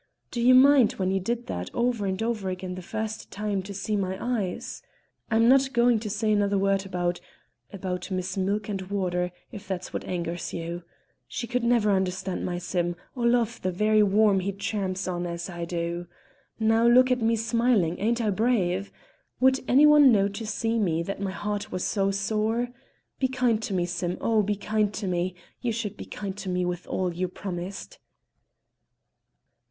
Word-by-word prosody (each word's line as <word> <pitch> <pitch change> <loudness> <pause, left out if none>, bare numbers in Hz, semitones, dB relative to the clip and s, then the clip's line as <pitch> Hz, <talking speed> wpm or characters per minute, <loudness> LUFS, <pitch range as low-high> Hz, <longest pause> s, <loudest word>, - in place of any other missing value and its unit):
Do 240 - -2
you 255 +2 +6
mind 265 -2 +6
when 185 -1 -1
you 195 - +1
did 235 +5 -2
that 90 +1 -4
over 235 -4 0
and 190 +3 -1
over 220 -4 -1
again 185 0 -4
the 185 - -6
first 220 +3 -5
time, 205 -1 -2
to 195 +2 -9
see 200 +2 -2
my 190 -2 -1
eyes? 220 -7 -3 0.5
I'm 225 0 +4
not 265 +1 +4
going 235 -2 +4
to 215 -1 -5
say 215 +1 0
another 205 -1 +2
word 195 0 +1
about 175 -1 -1 0.5
about 180 -2 -4
Miss 185 -1 -3
Milk 200 +2 -1
and 200 -3 -3
Water, 180 -3 -1 0.2
if 210 -3 -9
that's 185 -1 -4
what - - -3
angers 170 -1 -3
you. 170 +1 -4 0.5
She - - -4
could 245 0 -1
never 235 -3 +3
understand 190 -1 -1
my 175 -1 -2
Sim, 175 -1 -1 0.2
or 240 -2 +1
love 235 -1 +1
the 185 - 0
very 215 +4 +3
worm 205 0 +4
he 190 +2 -2
tramps 195 -1 -3
on 175 -1 -2
as 170 +1 -5
I 170 -1 -4
do. 170 0 -3 0.5
Now 225 +1 +3
look 255 +2 +6
at 250 -1 +2
me 225 +1 +3
smiling; 225 -6 +1
ain't 235 +3 +1
I 215 -2 +1
brave? 200 -3 +1 0.5
Would 265 +1 +4
any 275 +4 +6
one 295 -3 +8
know 200 -3 +4
to 215 +2 -6
see 225 +1 0
me 170 -5 +1
that 195 +2 -5
my 200 - -1
heart 205 +2 -4
was 185 - -2
sore? 215 +4 0 0.5
Be 265 - +2
kind 250 -4 +1
to 220 - -4
me, 175 -1 +1
Sim, 175 0 -3
oh! 225 -2 +2
be 205 0 0
kind 210 0 0
to 215 - -4
me; 180 0 -1 0.3
you 240 - 0
should 220 -3 -3
be - - -8
kind 195 -2 -6
to 195 - -5
me, 180 0 0
with 175 0 -4
all 185 -2 -1
you 185 +2 -1
promised!" 190 - -6
200 Hz, 190 wpm, -26 LUFS, 185-230 Hz, 0.5 s, one